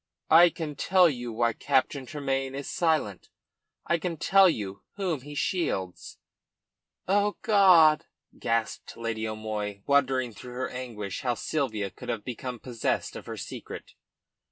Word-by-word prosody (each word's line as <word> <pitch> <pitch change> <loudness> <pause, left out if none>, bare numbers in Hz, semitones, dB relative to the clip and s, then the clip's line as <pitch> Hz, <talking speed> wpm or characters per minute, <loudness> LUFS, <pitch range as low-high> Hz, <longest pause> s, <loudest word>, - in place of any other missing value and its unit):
"I 170 +2 +8
can 160 -3 -6
tell 185 +4 +4
you 120 -6 -3
why 115 +1 +1
Captain 135 0 0
Tremayne 135 0 -2
is 140 0 -5
silent. 155 - 0 0.6
I 170 - +1
can 170 0 -3
tell 195 +4 +5
you 100 - -4
whom 180 -8 -2
he 145 +2 -10
shields." 95 - -2 0.9
"Oh 205 +2 +2
God!" 170 -7 +6 0.3
gasped 115 -2 -2
Lady 115 -1 -3
O'Moy, 105 -2 -4
wondering 130 -4 +2
through 125 +5 -10
her 130 +1 -3
anguish 115 -6 -6
how 125 -2 0
Sylvia 110 -12 -2
could - - -10
have 105 - -2
become 125 0 -5
possessed 120 -1 -2
of - - -9
her - - -6
secret. - - -8
130 Hz, 140 wpm, -27 LUFS, 115-160 Hz, 0.9 s, I